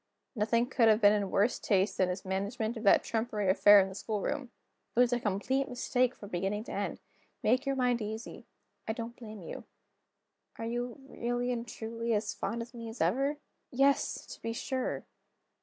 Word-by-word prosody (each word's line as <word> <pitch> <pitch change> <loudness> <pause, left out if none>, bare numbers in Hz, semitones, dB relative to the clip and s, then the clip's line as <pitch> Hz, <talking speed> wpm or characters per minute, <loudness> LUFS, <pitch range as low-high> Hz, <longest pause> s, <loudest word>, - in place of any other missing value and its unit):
Nothing 230 +2 +2
could 245 -2 +3
have 215 -1 +5
been 205 -2 +6
in 205 -2 0
worse 205 +6 +2
taste 195 -1 +1
than 185 -1 +3
his 180 +2 -4
management 205 +5 -2
of 225 - -6
that 200 - +6
trumpery 220 -4 0
affair 205 +1 +8
in 190 - +3
the 190 - -8
schoolroom; 215 +5 -3 0.5
it - - +2
was 245 0 +5
a 245 - +1
complete 245 +6 0
mistake 250 0 +1
from 205 - -10
beginning 195 +4 -1
to - - -9
end. - - -3 0.4
Make 255 +5 +2
your 275 - +1
mind 250 -2 +1
easy; 220 +2 -6 0.4
I 220 - 0
don't 230 +1 -6
blame 215 -6 -9
You." - - -7 0.9
"Are 225 - -4
you, 240 +2 -3
really 245 0 -2
and 235 -1 -3
truly, 230 +1 -2
as 205 -1 -1
fond 230 +2 -3
of 235 +1 -14
me 230 -1 -7
as 225 - -9
ever?" 270 - +1 0.3
"Yes, 275 +2 +2
to - - -14
be 230 - -3
sure!" 260 +2 -2
230 Hz, 190 wpm, -31 LUFS, 205-245 Hz, 0.9 s, affair